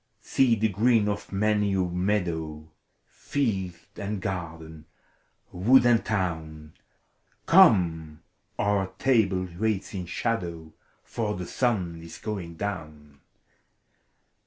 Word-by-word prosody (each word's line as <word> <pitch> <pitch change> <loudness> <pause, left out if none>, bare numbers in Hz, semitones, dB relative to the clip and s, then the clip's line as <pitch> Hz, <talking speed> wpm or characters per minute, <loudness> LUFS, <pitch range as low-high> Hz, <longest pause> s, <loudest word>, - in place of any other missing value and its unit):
See 125 -3 +2
the 110 0 +1
green 110 +2 +2
of 105 0 -3
piuiy 105 0 +1
a 90 -2 -1
meadow. 80 -5 -2 0.3
Field 95 -11 -2 0.2
and 105 0 -3
garden, 80 -4 -6 0.7
yrood 120 +8 +5
and 120 -2 +4
town! 80 -7 -3 0.7
Come, 85 - +4 0.3
our 100 -2 +1
table 100 -8 +2
waits 110 -3 -1
in 90 -3 -5
shadow! 85 -7 -3 0.3
For 110 -3 -3
the 90 0 -5
sun 90 -7 -1
is 85 0 -10
going 95 -6 -5
down. 75 -7 -6
95 Hz, 105 wpm, -26 LUFS, 80-105 Hz, 0.7 s, yrood